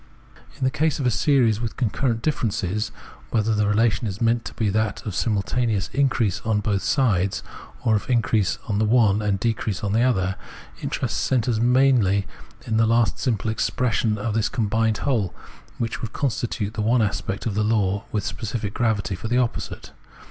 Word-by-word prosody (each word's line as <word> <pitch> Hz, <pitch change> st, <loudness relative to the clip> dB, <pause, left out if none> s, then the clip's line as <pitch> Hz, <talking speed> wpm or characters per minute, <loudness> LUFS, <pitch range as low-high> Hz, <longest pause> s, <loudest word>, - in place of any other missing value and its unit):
In 140 Hz, -, -5 dB
the 130 Hz, -, +2 dB
case 155 Hz, +1 st, +1 dB
of 135 Hz, -, -1 dB
a 125 Hz, -, +3 dB
series 115 Hz, -, +2 dB
with 115 Hz, -2 st, -4 dB
concurrent 115 Hz, 0 st, 0 dB
differences 105 Hz, -, -1 dB, 0.2 s
— -, -, -22 dB
whether 110 Hz, -1 st, +1 dB
the 105 Hz, -1 st, +1 dB
relation 110 Hz, +1 st, +2 dB
is 95 Hz, 0 st, -5 dB
meant 115 Hz, 0 st, +2 dB
to -, -, -6 dB
be 110 Hz, -, 0 dB
that 110 Hz, 0 st, -1 dB
of 105 Hz, -, -3 dB
simultaneous 105 Hz, +1 st, 0 dB
increase 120 Hz, -8 st, +1 dB
on 110 Hz, -2 st, +1 dB
both 100 Hz, -1 st, 0 dB
sides 100 Hz, -8 st, +1 dB, 0.4 s
or 110 Hz, -, +4 dB
of 105 Hz, -, -7 dB
increase 115 Hz, -5 st, +2 dB
in 105 Hz, -2 st, 0 dB
the 110 Hz, -, +2 dB
one 110 Hz, -2 st, +3 dB
and 100 Hz, -2 st, 0 dB
decrease 110 Hz, -3 st, -1 dB
in 100 Hz, -1 st, -1 dB
the 115 Hz, -, +3 dB
other 95 Hz, -7 st, +1 dB, 0.2 s
— -, -, -18 dB
interest -, -, -2 dB
centres 120 Hz, -3 st, +1 dB
merely 120 Hz, -5 st, +3 dB, 0.4 s
in 110 Hz, -, 0 dB
the 115 Hz, 0 st, +4 dB
last 115 Hz, 0 st, +2 dB
simple 110 Hz, -4 st, 0 dB
expression 110 Hz, -1 st, 0 dB
of 105 Hz, +1 st, -2 dB
this 110 Hz, 0 st, +1 dB
combined 110 Hz, -1 st, 0 dB
whole, 115 Hz, -10 st, -1 dB, 0.4 s
which 115 Hz, -1 st, -3 dB
would 110 Hz, -2 st, -5 dB
constitute 115 Hz, -5 st, -2 dB
the 110 Hz, -, -3 dB
one 115 Hz, +2 st, +3 dB
aspect 100 Hz, -1 st, -2 dB
of 115 Hz, -, -1 dB
the 105 Hz, +1 st, +1 dB
law 105 Hz, -2 st, +1 dB
with 105 Hz, -, -1 dB
specific 105 Hz, -2 st, -4 dB
gravity 105 Hz, -5 st, 0 dB
for 90 Hz, +4 st, -5 dB
the 120 Hz, +2 st, +1 dB
opposite. 125 Hz, -2 st, -2 dB
110 Hz, 185 wpm, -23 LUFS, 105-120 Hz, 0.4 s, or